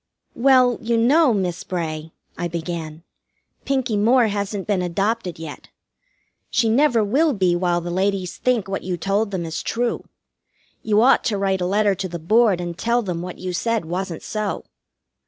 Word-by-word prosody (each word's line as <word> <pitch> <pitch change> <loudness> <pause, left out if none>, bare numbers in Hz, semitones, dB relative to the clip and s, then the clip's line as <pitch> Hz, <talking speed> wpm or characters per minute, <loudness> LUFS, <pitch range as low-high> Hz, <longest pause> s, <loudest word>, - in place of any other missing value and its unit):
"Well, 255 -1 +4
you 230 +1 0
know, 275 +5 +4
Miss 185 -5 -1
Bray," 160 -3 -4 0.2
I 175 - -2
began, 165 -1 -5 0.6
"Pinkie 260 -5 0
Moore 230 +2 +4
hasn't 200 -1 -3
been 200 -3 0
adopted 190 +1 -1
yet. 160 -2 -9 0.8
She 230 -2 +2
never 240 -1 +3
will 285 +9 +2
be 185 -5 +2
while 175 -1 +1
the 175 +1 -5
ladies 190 0 -1
think 245 -6 0
what 195 0 -3
you 180 -1 -3
told 200 +5 0
them 185 -4 -3
is 160 0 -4
true. 240 +1 -2 0.8
You 215 0 +3
ought 260 - +5
to 205 - 0
write 195 -1 0
a 180 - 0
letter 205 +1 +2
to 190 0 -4
the 170 - -5
Board 210 +3 +3
and 175 -1 -4
tell 235 +5 0
them 175 -4 -3
what 180 0 -7
you 185 -1 -5
said 230 +1 -1
wasn't 175 0 -4
so." 215 -2 -3
195 Hz, 175 wpm, -22 LUFS, 175-230 Hz, 0.8 s, ought